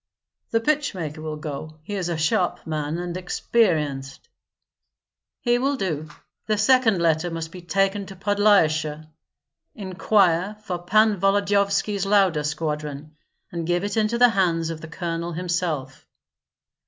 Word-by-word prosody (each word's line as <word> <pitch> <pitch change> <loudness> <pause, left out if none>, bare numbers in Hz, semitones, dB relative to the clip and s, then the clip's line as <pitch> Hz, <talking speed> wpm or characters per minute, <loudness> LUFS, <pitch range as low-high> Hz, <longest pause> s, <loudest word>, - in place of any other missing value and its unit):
"The 225 - +2
pitch 290 0 0
maker 155 -3 -5
will 155 -1 -4
go; 155 0 -7
he 205 - -7
is 185 -3 -2
a 170 - -1
sharp 160 +3 0
man 155 0 -2
and 175 0 -4
experienced." 155 -8 -1 1.1
"He 240 -1 +2
will 275 +3 +1
do. 155 - -3 0.4
The 215 -1 +1
second 225 -3 +4
letter 165 0 +2
must 165 -1 -5
be 180 - -9
taken 195 +2 0
to 195 - -9
Podlyasye; 175 -6 +2 0.7
inquire 190 -1 +1
for 180 -4 -3
Pan 215 +3 +3
Volodyovski's 200 0 +1
Lauda 190 -7 +3
squadron, 150 -1 -4 0.4
and 170 -2 -4
give 175 +1 +1
it 205 0 -2
into 220 +1 +1
the 245 0 +6
hands 170 -5 +1
of 160 -1 -7
the 160 - -8
colonel 170 0 -4
himself." 165 -6 -3
175 Hz, 140 wpm, -24 LUFS, 160-205 Hz, 1.1 s, the